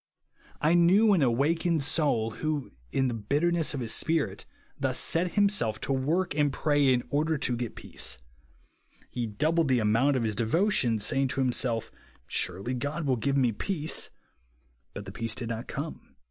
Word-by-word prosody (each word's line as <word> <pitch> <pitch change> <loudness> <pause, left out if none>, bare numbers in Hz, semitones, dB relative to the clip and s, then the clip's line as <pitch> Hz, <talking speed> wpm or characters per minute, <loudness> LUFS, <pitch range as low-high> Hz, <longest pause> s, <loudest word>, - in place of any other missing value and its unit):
I 155 +3 +3
knew 190 +5 +5
an 180 - +3
awakened 150 +6 +1
soul 140 -7 +1
who, 150 +3 -3 0.2
in 135 - +1
the 125 - -2
bitterness 150 +9 0
of 135 - -4
his 115 -2 0
spirit, 160 -2 -1 0.3
thus - - 0
set 170 +1 +1
himself 200 - +2
to 135 - -1
work 155 +7 0
and 145 -1 +1
pray 145 -1 +2
in 125 -1 +1
order 155 +2 +1
to 125 -3 0
get 120 -1 -5
peace. - - -3 0.9
He 120 -2 -3
doubled 155 +10 +1
the 130 -1 +3
amount 115 +6 +2
of 120 - -1
his 110 -2 -1
devotions, 120 - +1
saying 135 +3 +1
to 135 +1 -2
himsolf. 120 -3 0 0.3
Surely 95 +8 -3
God 145 +6 -3
will 135 -2 +2
give 135 +4 0
me 125 -3 +3
peace. 155 - -2 0.9
But - - -6
the - - -8
peace 115 -1 -2
did 120 -2 -4
not 115 +2 -4
come. 150 +3 -7
140 Hz, 170 wpm, -28 LUFS, 120-160 Hz, 0.9 s, knew